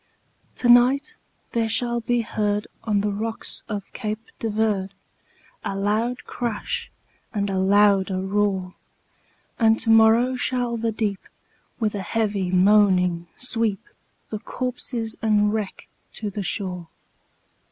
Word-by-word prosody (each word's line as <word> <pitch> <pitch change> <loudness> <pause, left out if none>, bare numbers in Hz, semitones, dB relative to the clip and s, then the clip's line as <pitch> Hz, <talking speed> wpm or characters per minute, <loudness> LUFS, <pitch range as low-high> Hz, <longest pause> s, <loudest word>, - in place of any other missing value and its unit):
"To 245 - -1
night 250 +4 +5 0.4
there 230 -1 0
shall 240 +1 +1
be 240 +1 0
heard 210 -2 -1 0.2
on 210 -3 +1
the 205 0 0
rocks 220 +2 -3
of 205 -2 -3
Cape 215 -1 -5
de 225 - -2
Verde, 205 -3 0 0.7
A 195 - -3
loud 215 +5 0
crash, 250 - -3 0.4
and 200 -3 -1
a 190 - 0
louder 195 -1 +3
roar; 190 -1 0 0.9
And 225 -1 +5
to 225 - +2
morrow 225 +3 +5
shall 245 -1 0
the 230 0 -1
deep, 210 -3 -2 0.6
with 215 -3 0
a 205 - -3
heavy 200 -1 -1
moaning, 185 -2 +4
sweep 230 -5 0 0.5
The 215 - -3
corpses 240 -2 -4
and 210 -1 +3
wreck 215 -3 -4 0.3
to 210 -2 -3
the 205 - -4
shore." 180 -3 -2
215 Hz, 130 wpm, -23 LUFS, 200-230 Hz, 0.9 s, night